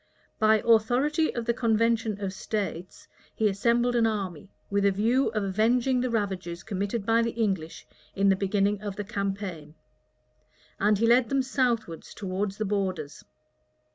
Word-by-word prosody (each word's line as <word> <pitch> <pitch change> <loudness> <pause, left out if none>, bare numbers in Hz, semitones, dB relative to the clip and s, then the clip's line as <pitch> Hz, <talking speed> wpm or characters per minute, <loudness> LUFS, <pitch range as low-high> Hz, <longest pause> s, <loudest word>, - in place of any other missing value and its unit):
By 215 0 +4
authority 245 +8 +3
of 235 -1 -3
the 235 - +1
convention 230 -2 +1
of 190 -1 -3
states, 195 -3 -5 0.3
he 220 - +2
assembled 235 +4 +1
an 230 -1 +3
army, 195 -6 -4 0.2
with 200 0 +1
a 200 - +4
view 230 +7 +2
of 215 -2 -1
avenging 235 +6 +2
the 255 - -1
ravages 190 -6 -3
committed 200 +1 -3
by 230 +1 +3
the 230 -1 -2
English 190 -7 -2 0.3
in 200 0 +2
the 195 - +4
beginning 200 +1 0
of 205 -2 -5
the 205 - -4
campaign; 195 -7 -4 1.0
and 210 +1 +3
he 225 - +1
led 240 0 +4
them 275 -1 +1
southwards 240 - -2
towards 195 +1 -3
the 215 - -2
borders. 185 -7 -3
210 Hz, 155 wpm, -27 LUFS, 195-230 Hz, 1.0 s, By